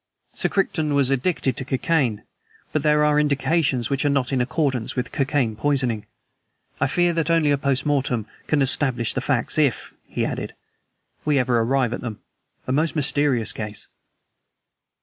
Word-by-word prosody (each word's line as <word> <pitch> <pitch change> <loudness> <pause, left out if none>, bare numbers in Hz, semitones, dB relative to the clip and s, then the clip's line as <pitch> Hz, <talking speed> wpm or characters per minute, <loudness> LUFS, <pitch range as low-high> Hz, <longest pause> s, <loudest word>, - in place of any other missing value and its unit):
"Sir - - -1
Crichton 160 -6 0
was 140 -2 +2
addicted 135 0 0
to - - 0
cocaine, 130 -5 0 0.5
but 155 - +1
there 150 0 +3
are 150 0 +3
indications 145 -3 +1
which 135 -1 0
are 145 - +2
not 140 -2 0
in 130 - +2
accordance 130 -3 -1
with 125 -2 -3
cocaine 135 -5 0
poisoning. 125 -4 -1 0.7
I - - +2
fear 175 -1 +2
that 165 0 -1
only 165 -3 +3
a 145 - +3
post 140 -1 0
mortem 130 -6 0 0.2
can 145 -2 +2
establish 125 -3 +2
the - - -2
facts - - 0
if," - - 0
he - - -2
added, - - -4 0.7
"we 150 -2 +2
ever 125 -2 +2
arrive 125 +1 +1
at - - -4
them. 115 -4 -6 0.5
A - - -3
most 155 +5 +1
mysterious 140 -5 +2
case!" 105 -1 -5
135 Hz, 165 wpm, -23 LUFS, 125-150 Hz, 0.7 s, there